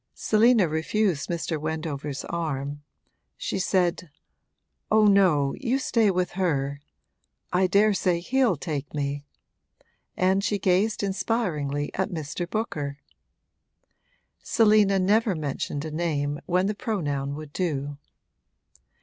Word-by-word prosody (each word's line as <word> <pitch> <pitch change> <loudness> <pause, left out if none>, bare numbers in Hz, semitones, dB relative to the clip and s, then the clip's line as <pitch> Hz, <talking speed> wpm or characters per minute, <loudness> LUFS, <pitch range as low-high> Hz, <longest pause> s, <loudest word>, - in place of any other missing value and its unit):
Selina 220 -2 +4
refused 160 +1 0
Mr. 165 -2 -2
Wendover's 155 -3 -4
arm; 145 -4 -3 0.6
she - - -3
said, 180 -2 0 0.8
'Oh 215 0 +5
no, 180 -9 +4
you 265 -1 0
stay 235 -6 +2
with 180 -1 0
her 140 -7 -1 0.7
I 185 +1 +3
daresay 195 -2 +3
he'll 250 +2 +2
take 150 -2 -5
me:' 145 0 -3 0.9
and 190 +1 +2
she 205 0 +1
gazed 195 +4 +1
inspiringly 170 -9 -1
at 190 - -1
Mr. 170 +1 -4
Booker. 150 -11 -3 1.4
Selina 210 -3 +4
never 205 +2 +2
mentioned 145 -1 -3
a 155 - -5
name 145 -3 -1
when 180 +1 +2
the 210 - 0
pronoun 145 - -2
would 155 -1 -9
do. 145 -5 -2
175 Hz, 110 wpm, -26 LUFS, 145-200 Hz, 1.4 s, Oh